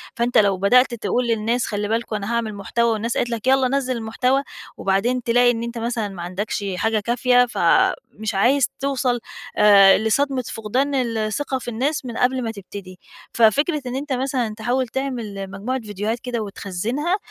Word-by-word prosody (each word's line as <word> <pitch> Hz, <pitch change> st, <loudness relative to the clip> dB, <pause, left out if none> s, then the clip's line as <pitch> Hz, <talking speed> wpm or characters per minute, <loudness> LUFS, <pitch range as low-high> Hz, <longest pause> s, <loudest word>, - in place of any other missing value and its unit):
فأنتَ 240 Hz, +1 st, +1 dB
لو 200 Hz, -2 st, +4 dB
بدأت 245 Hz, +7 st, +4 dB
تقول 240 Hz, +1 st, -1 dB
للناس 230 Hz, +1 st, 0 dB
خلي 205 Hz, -1 st, -3 dB
بالكم 225 Hz, 0 st, -2 dB
أنا 210 Hz, +2 st, -3 dB
هاعمل 225 Hz, -3 st, -2 dB
محتوى 230 Hz, +4 st, 0 dB
والناس 225 Hz, +2 st, -2 dB
قالت 240 Hz, -, 0 dB
لَك 230 Hz, 0 st, -4 dB
يلَّا 265 Hz, 0 st, +4 dB
نزل 260 Hz, -1 st, -1 dB
المحتوى، 250 Hz, +4 st, 0 dB, 0.3 s
وبعدين 230 Hz, +6 st, 0 dB
تلاقي 245 Hz, +1 st, +4 dB
إن 230 Hz, -1 st, -3 dB
أنتَ 235 Hz, 0 st, -5 dB
مثلًا 230 Hz, -2 st, -2 dB
ما 190 Hz, -3 st, -8 dB
عندكش 195 Hz, +4 st, -3 dB
حاجة 220 Hz, +2 st, +1 dB
كافية، 245 Hz, +3 st, +3 dB
فمش 220 Hz, -, 0 dB
عايز 250 Hz, +7 st, +3 dB
توصل 260 Hz, -3 st, 0 dB, 0.4 s
آآ 200 Hz, -2 st, +7 dB
لصدمة 255 Hz, +5 st, 0 dB, 0.2 s
فقدان 265 Hz, +7 st, 0 dB
الثقة 240 Hz, +2 st, -1 dB
في -, -, -11 dB
الناس 265 Hz, +5 st, -1 dB
من 235 Hz, -2 st, -6 dB
قبل 255 Hz, 0 st, +1 dB
ما 225 Hz, -, -2 dB
تبتدي. 195 Hz, -3 st, -10 dB, 0.3 s
ففكرة 285 Hz, +8 st, +3 dB
إن 250 Hz, -, -4 dB
أنتَ 280 Hz, +1 st, -3 dB
مثلًا 255 Hz, -3 st, -1 dB
تحاول 245 Hz, +3 st, 0 dB
تعمل 225 Hz, -7 st, -4 dB
مجموعة 225 Hz, +7 st, -3 dB
فيديوهات 210 Hz, +2 st, -3 dB
كده 245 Hz, -1 st, -4 dB
وتخزنها، 215 Hz, -, -2 dB
235 Hz, 165 wpm, -21 LUFS, 210-255 Hz, 0.4 s, آآ